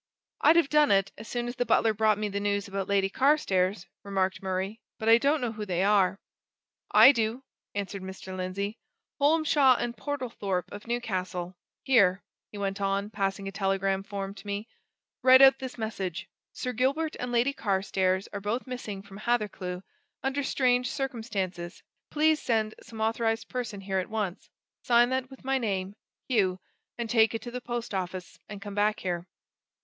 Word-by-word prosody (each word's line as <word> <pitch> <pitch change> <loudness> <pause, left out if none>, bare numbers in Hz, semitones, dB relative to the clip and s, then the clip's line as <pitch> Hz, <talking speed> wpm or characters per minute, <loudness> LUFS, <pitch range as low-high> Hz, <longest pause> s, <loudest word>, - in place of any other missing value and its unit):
"I'd 315 - +6
have 335 -4 +4
done 300 -1 +4
it, 195 0 +3
as 220 - -10
soon 240 +1 -3
as 245 +1 -5
the 245 - +2
butler 225 0 +3
brought 215 0 +3
me 210 0 -1
the 200 0 -3
news 200 0 -1
about 195 -1 -3
Lady 200 -1 +2
Carstairs," 195 - +2 0.2
remarked 190 -2 -1
Murray, 190 +3 -3 0.2
"but 220 - -4
I 230 +1 +7
don't 285 +3 +2
know 245 -2 -1
who 215 -1 -6
they 185 -2 0
are." 195 -1 +3 0.7
"I 265 - +9
do!" 230 0 -1 0.3
answered 200 -1 -3
Mr. 190 0 -8
Lindsey. 195 +4 -3 0.4
"Holmshaw 295 -3 +4
and 240 0 -2
Portlethorpe 230 -8 -3
of 205 +2 -9
Newcastle. 185 -6 -3 0.3
Here," 200 -8 +4 0.3
he 210 - -9
went 200 0 -3
on, 200 +1 0
passing 195 -2 -2
a - - -4
telegram 195 -1 0
form 195 0 -5
to 200 +1 -13
me. 205 +2 -3 0.5
"Write 260 +1 +8
out 270 0 +7
this 260 -1 -6
message: 195 -6 -4 0.2
'Sir 250 - -4
Gilbert 280 +7 0
and 250 0 -3
Lady 245 +3 +2
Carstairs 190 -3 0
are 200 - -4
both 215 +5 -2
missing 220 -6 -6
from 200 -1 -12
Hathercleugh 205 -6 -2 0.4
under 270 +2 0
strange 250 -2 +2
circumstances 200 -10 -4 0.3
please 310 0 +2
send 220 -2 0
some 220 -1 -9
authorized 225 0 0
person 235 -6 -4
here 190 -1 -1
at 185 - -4
once.' 210 -5 -3 0.3
Sign 240 0 +4
that 260 0 -1
with 265 -1 -14
my 270 0 +1
name, 195 -4 -2 0.3
Hugh 190 -7 +1 0.4
and 235 -1 -3
take 225 -1 +3
it 225 - -4
to 240 - -7
the 250 +1 -5
post 240 -2 -4
office, 180 -2 -4
and 205 -1 -7
come 205 -1 -7
back 210 +1 +1
here." 175 -1 -3
210 Hz, 175 wpm, -28 LUFS, 195-245 Hz, 0.7 s, I